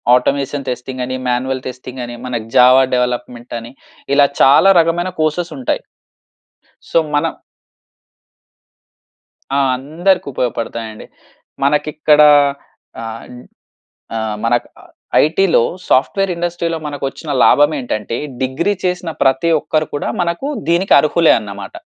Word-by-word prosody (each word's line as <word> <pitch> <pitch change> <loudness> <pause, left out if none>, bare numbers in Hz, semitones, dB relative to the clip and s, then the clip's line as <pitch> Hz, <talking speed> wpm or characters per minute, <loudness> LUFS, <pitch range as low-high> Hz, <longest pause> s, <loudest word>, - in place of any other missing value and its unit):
Automation 140 +2 -1
testing 125 +1 -5
అని, 130 - -4
manual 130 +1 -1
testing 130 0 -8
అని, 120 - -8
మన 125 -1 -4 0.2
జావ 125 +1 +7 0.2
డెవలప్మెంట్ 125 -1 -3
అని 115 +1 -11 0.4
ఇలా 145 0 +6 0.2
చాలా 145 +8 +6
రకమైన 170 +2 0
కోర్సెస్ 155 +3 -1
ఉంటాయి. 375 - -1 1.1
సో, - - +2 0.2
మనం 160 +3 +1 2.2
ఆ! - - +2 0.2
అందరికి 165 +8 0
ఉపయోగపడుతాయండి. 115 -3 -4 0.6
మనకిక్కడ 150 +1 +2 0.8
ఆహ్, 115 0 -7 0.9
ఆహ్, 110 -1 -3
మనకి 120 +1 +1 0.6
ఐటీ‌లో 165 -2 +3 0.3
సాఫ్ట్‌వేర్ 195 +8 +2
ఇండస్ట్రీ‌లో 170 -1 -2
మనకొచ్చిన 145 +1 -5
లాభం 145 +1 +5
ఏంటంటే, 115 -2 -4 0.2
డిగ్రీ 155 +10 0
చేసిన 180 -1 -2
ప్రతి 135 +5 +2
ఒక్కరు 155 -1 -1
కూడా 145 - -3
మనకు 170 +10 -2 0.2
దీనికి 175 +3 +2
అర్హులే 160 +2 +3
అన్నమాట. 100 -2 -9
140 Hz, 105 wpm, -16 LUFS, 125-165 Hz, 2.2 s, జావ